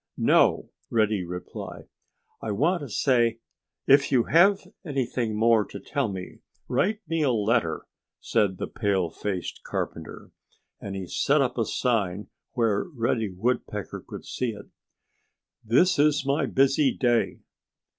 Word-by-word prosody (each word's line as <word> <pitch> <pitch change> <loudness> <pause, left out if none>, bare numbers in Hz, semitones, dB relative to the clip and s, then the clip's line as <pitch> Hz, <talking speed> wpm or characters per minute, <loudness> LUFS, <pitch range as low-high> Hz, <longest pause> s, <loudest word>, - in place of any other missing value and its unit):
"No!" - - +3 0.2
Reddy 110 -4 +1
replied. 90 +1 -8 0.5
"I 110 - -4
want 160 - +1
to 140 - -7
say——" 120 0 +2 0.5
"If 140 +1 +5
you 125 -4 +4
have 190 - +4 0.2
anything 130 - -2
more 115 0 +4
to 100 - -9
tell 140 +6 -2
me, 95 -3 -7 0.3
write 210 +3 0
me 165 0 -1
a 145 - +3
letter!" 110 -5 0 0.3
said 95 -3 0
the - - -3
pale 100 -6 -1
faced 95 -4 -4
carpenter. 80 - -5 0.5
And 100 -1 -6
he 95 -1 -4
set 145 +10 +1
up 125 -2 0
a 115 - 0
sign 105 -6 -1 0.2
where 110 -4 +1
Reddy 115 - -1
Woodpecker 115 +7 -3
could - - -9
see 125 -3 -2
it: 100 -1 -12 0.9
"This 140 - +3
Is 145 -2 +3
My 140 +1 +1
Busy 135 +1 +3
Day!" 120 -2 +1
115 Hz, 135 wpm, -26 LUFS, 105-140 Hz, 0.9 s, If